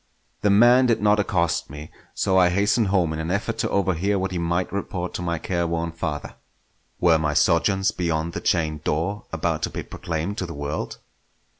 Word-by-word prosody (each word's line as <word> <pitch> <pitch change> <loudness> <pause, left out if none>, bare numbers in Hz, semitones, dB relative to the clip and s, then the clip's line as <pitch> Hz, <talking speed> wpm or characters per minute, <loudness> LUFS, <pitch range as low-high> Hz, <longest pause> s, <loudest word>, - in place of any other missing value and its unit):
The 105 - +2
man 120 +5 +6
did 115 - +2
not 105 0 +3
accost 90 -4 0
me, 75 +2 -9 0.2
so 95 - +1
I 90 -1 +5
hastened 100 +4 +2
home 90 -5 +1
in 80 - -4
an 80 +1 -3
effort 110 +4 -2
to - - 0
overhear 95 +1 +1
what 95 0 -2
he 90 - -2
might 85 +2 -1
report 90 -2 -3
to - - -4
my 85 -1 -1
careworn 85 -1 -2
father. 80 -3 -4 0.7
Were 85 -2 +4
my 75 -2 -1
sojourns 95 +5 +3
beyond 85 -1 -2
the - - -4
chained 75 -3 0
door 85 +9 -2
about 80 -1 -1
to - - -1
be - - -5
proclaimed 85 +6 -4
to 90 - -3
the 85 - -7
world? 75 +1 -4
85 Hz, 190 wpm, -23 LUFS, 80-100 Hz, 0.7 s, man